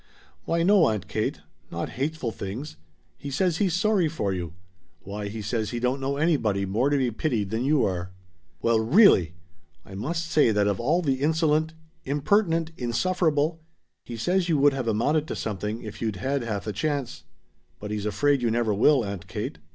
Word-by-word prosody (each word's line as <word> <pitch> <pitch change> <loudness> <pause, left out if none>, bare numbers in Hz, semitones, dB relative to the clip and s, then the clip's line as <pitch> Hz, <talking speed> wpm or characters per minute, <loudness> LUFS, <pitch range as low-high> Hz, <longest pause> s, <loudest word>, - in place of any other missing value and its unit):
"Why 165 0 +1
no, 195 -2 +5
Aunt 105 -3 -2
Kate; 110 +1 -2 0.3
not - - -4
hateful 140 -2 -3
things. 110 - -6 0.4
He 140 - -6
says 165 +4 0
he's 185 -3 +1
sorry 195 -2 +2
for 105 -11 -2
you. 85 -3 -5 0.5
Why, 100 +2 -6
he 105 +1 -6
says 110 0 -2
he 120 - -3
don't 125 +3 0
know 140 +1 -1
anybody 115 - +1
more 110 +8 +1
to 145 - +2
be 130 -3 +1
pitied 110 -5 -1
than 115 +3 -1
you 145 -1 +3
are." 90 -1 -2 0.5
"Well 115 -1 +3
really! 110 - +5 0.5
I 95 - -12
must 165 - -3
say 155 -6 +3
that 105 -2 +2
of 100 -2 0
all 155 +9 +1
the 135 -3 0
insolent 160 +1 +1 0.3
impertinent 165 +3 +1
insufferable 160 +4 0 0.2
" 75 -1 -53
"He 120 - -7
says 180 +9 0
you 160 - +3
would 145 0 +4
have 130 -3 -3
amounted 145 +8 +1
to - - -4
something 105 +1 -4
if 105 -2 -8
you'd 110 -3 -1
had 135 +9 -1
half 110 -4 -4
a 105 - -3
chance. 120 - -3 0.5
But 105 0 -6
he's 105 0 -2
afraid 135 +7 +2
you 120 - +1
never 115 -1 +1
will, 125 +4 +4
Aunt 100 -3 -6
Kate." - - -5
125 Hz, 190 wpm, -25 LUFS, 105-155 Hz, 0.5 s, no